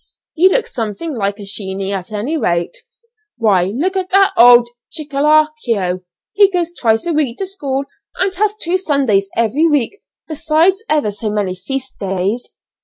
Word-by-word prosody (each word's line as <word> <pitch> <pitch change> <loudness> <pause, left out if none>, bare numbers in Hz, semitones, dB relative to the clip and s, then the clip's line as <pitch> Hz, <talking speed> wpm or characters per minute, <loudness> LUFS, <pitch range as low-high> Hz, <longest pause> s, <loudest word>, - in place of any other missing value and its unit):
You 360 +3 +4
look - - +1
something 235 +7 -5
like 200 -4 -2
a 205 - -9
sheeney 195 -1 -2
at 195 0 -5
any 215 +9 -2
rate. 170 - -1 0.6
Why 205 -6 +2
look 290 - -2
at 370 -1 -2
that 390 +1 +4
old 240 0 +7 0.2
'Chickarlico;' 290 - 0 0.3
he 400 -1 +5
goes 350 -3 -1
twice 225 -8 0
a 340 - -1
week 285 -6 0
to 390 - -3
school 280 -8 -3 0.3
and 380 +1 0
has 415 +2 0
two 370 -3 0
Sundays 265 - +1
every 245 +9 +2
week, 295 - 0 0.3
besides 325 +5 +1
ever 295 -9 +2
so 210 +2 -4
many 205 -3 -1
feast 260 +8 -6
days." 195 +5 -2
270 Hz, 160 wpm, -16 LUFS, 205-335 Hz, 0.6 s, old